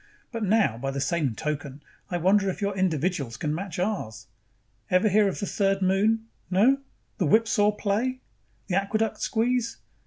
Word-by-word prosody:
But 230 Hz, -2 st, -3 dB
now, 200 Hz, -, +2 dB
by 135 Hz, +2 st, -2 dB
the 135 Hz, 0 st, -3 dB
same 145 Hz, -5 st, 0 dB
token, 145 Hz, 0 st, -4 dB, 0.3 s
I 175 Hz, -, -1 dB
wonder 195 Hz, +3 st, +3 dB
if 185 Hz, -, -4 dB
your 200 Hz, -1 st, -1 dB
individuals 165 Hz, -8 st, -1 dB
can 150 Hz, -1 st, -2 dB
match 185 Hz, +2 st, -5 dB
ours. 175 Hz, -, -3 dB, 0.6 s
Ever 185 Hz, +4 st, +3 dB
hear 205 Hz, +1 st, +4 dB
of 195 Hz, -, -3 dB
the 200 Hz, -, -2 dB
Third 195 Hz, -1 st, 0 dB
Moon? 210 Hz, +4 st, +2 dB, 0.2 s
No? 225 Hz, +9 st, +4 dB, 0.4 s
The 180 Hz, -, +2 dB
whipsaw 210 Hz, +2 st, +4 dB
play? 220 Hz, +5 st, -1 dB, 0.4 s
The 190 Hz, -, -4 dB
aqueduct 215 Hz, +2 st, -1 dB
squeeze? 235 Hz, +1 st, 0 dB
195 Hz, 160 wpm, -26 LUFS, 160-215 Hz, 0.6 s, hear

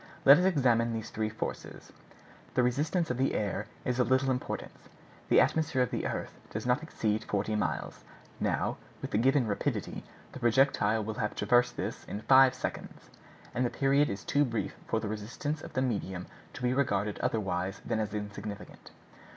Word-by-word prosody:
Let 140 Hz, +3 st, +9 dB
us 180 Hz, -, +2 dB
examine 120 Hz, -9 st, +3 dB
these 110 Hz, 0 st, -5 dB
three 110 Hz, 0 st, -1 dB
forces. 110 Hz, -, -6 dB, 0.6 s
The 125 Hz, -, +4 dB
resistance 150 Hz, +6 st, +1 dB
of 125 Hz, -, -2 dB
the 135 Hz, -, +1 dB
air 105 Hz, 0 st, -2 dB, 0.2 s
is 125 Hz, 0 st, 0 dB
of 125 Hz, -1 st, +2 dB
little 130 Hz, +1 st, +3 dB
importance. 125 Hz, 0 st, -5 dB, 0.4 s
The -, -, +6 dB
atmosphere 145 Hz, -5 st, +2 dB
of 125 Hz, -, -3 dB
the -, -, -1 dB
earth -, -, -4 dB, 0.2 s
does 110 Hz, +2 st, -5 dB
not 125 Hz, +3 st, +2 dB
exceed 110 Hz, -9 st, -1 dB
forty 105 Hz, +1 st, -1 dB
miles. 105 Hz, -, -2 dB, 0.4 s
Now, -, -, 0 dB, 0.2 s
with -, -, -6 dB
the 105 Hz, -, +2 dB
given 135 Hz, +2 st, +3 dB
rapidity, 100 Hz, -2 st, -2 dB, 0.3 s
the -, -, -8 dB
projectile 120 Hz, -2 st, +3 dB
will 110 Hz, +1 st, -3 dB
have 105 Hz, -, -2 dB
traversed 125 Hz, 0 st, +3 dB
this -, -, -4 dB
in 105 Hz, -, -5 dB
five 130 Hz, +1 st, +6 dB
seconds, -, -, -6 dB, 0.4 s
and 125 Hz, -, 0 dB
the 120 Hz, -, +1 dB
period 140 Hz, +3 st, +2 dB
is 100 Hz, +1 st, -4 dB
too 145 Hz, 0 st, +3 dB
brief 115 Hz, -5 st, -2 dB
for 110 Hz, -, +1 dB
the 110 Hz, -, -4 dB
resistance 115 Hz, +8 st, -4 dB
of -, -, -9 dB
the 130 Hz, -, +1 dB
medium 95 Hz, -7 st, -2 dB, 0.3 s
to -, -, -8 dB
be 125 Hz, 0 st, +2 dB
regarded 105 Hz, -7 st, 0 dB
otherwise 95 Hz, -3 st, -1 dB
than 110 Hz, -, -1 dB
as 105 Hz, -1 st, -2 dB
insignificant. 105 Hz, 0 st, -7 dB
120 Hz, 180 wpm, -30 LUFS, 105-130 Hz, 0.6 s, Let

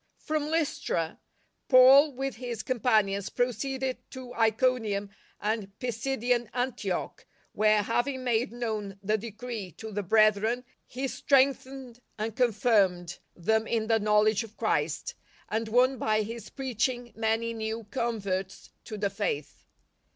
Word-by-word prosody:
From 305 Hz, -1 st, -2 dB
Lystra 290 Hz, -, -1 dB, 0.5 s
Paul, 270 Hz, +3 st, +8 dB
with 270 Hz, -2 st, -3 dB
his 235 Hz, -3 st, -5 dB
companions, 215 Hz, -5 st, +1 dB
proceeded 255 Hz, +2 st, -1 dB
to 255 Hz, -1 st, -9 dB
Iconium 225 Hz, -3 st, +1 dB, 0.3 s
and 210 Hz, -2 st, -3 dB
.Pisidian 245 Hz, -1 st, -1 dB
Antioch, 245 Hz, -7 st, -3 dB, 0.2 s
where, 215 Hz, 0 st, +3 dB
having 255 Hz, +4 st, -1 dB
made 235 Hz, -3 st, +1 dB
known 215 Hz, -5 st, -4 dB
the 210 Hz, +2 st, +2 dB
decree 225 Hz, -2 st, -6 dB
to 220 Hz, 0 st, -8 dB
the 205 Hz, 0 st, -2 dB
brethren, 215 Hz, +4 st, +3 dB, 0.2 s
he 265 Hz, +2 st, -3 dB
strengthened 265 Hz, -1 st, +1 dB, 0.2 s
and 220 Hz, 0 st, -3 dB
confirmed 205 Hz, -8 st, +2 dB, 0.2 s
them 220 Hz, +5 st, +1 dB
in 225 Hz, -2 st, 0 dB
the 225 Hz, 0 st, +2 dB
knowledge 210 Hz, +1 st, +3 dB
of 220 Hz, -1 st, -13 dB
Christ, -, -, -1 dB, 0.4 s
and 220 Hz, +1 st, -1 dB
won 250 Hz, +3 st, +3 dB
by 215 Hz, 0 st, +1 dB
his 225 Hz, 0 st, -7 dB
preaching 245 Hz, -2 st, -2 dB
many 225 Hz, +1 st, 0 dB
new 220 Hz, 0 st, -4 dB
converts 200 Hz, -6 st, -3 dB
to 215 Hz, -, -6 dB
the 200 Hz, -1 st, -1 dB
Faith. 165 Hz, -8 st, -4 dB
225 Hz, 125 wpm, -28 LUFS, 210-250 Hz, 0.5 s, Paul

